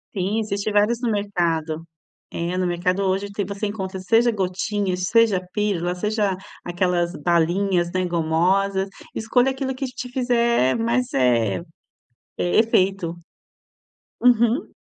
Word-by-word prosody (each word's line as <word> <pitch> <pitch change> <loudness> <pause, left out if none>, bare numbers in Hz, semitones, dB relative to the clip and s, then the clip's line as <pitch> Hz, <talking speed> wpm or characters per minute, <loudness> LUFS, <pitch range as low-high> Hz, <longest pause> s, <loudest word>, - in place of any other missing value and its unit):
Sim, 200 +3 0
existe 210 -1 -2
vários 210 +3 +2
no 235 -3 0
mercado, 170 -6 -1 0.5
é 170 +2 -3
no 185 - 0
mercado 180 +2 0
hoje 195 +1 -1
tem 200 0 -2
você 200 +2 -3
encontra, 190 -2 -5
seja 230 +5 +3
gotinhas, 190 -1 -2
seja 205 -2 +3
pílula, 195 -5 0
seja 210 0 0 0.3
aquelas 175 -1 0
balinhas, 175 +3 +1
né, 185 0 0
gomosas, 180 +4 +1 0.3
escolha 245 +4 +2
aquilo 265 0 -3
que 270 +1 -3
te 250 0 -6
fizer 235 - +2
mais, 235 +2 0
eh 120 -6 +2 0.8
eh, 175 - +2
efeito. 195 -5 +1 1.1
Uhum. 240 +3 +3
195 Hz, 125 wpm, -22 LUFS, 175-220 Hz, 1.1 s, seja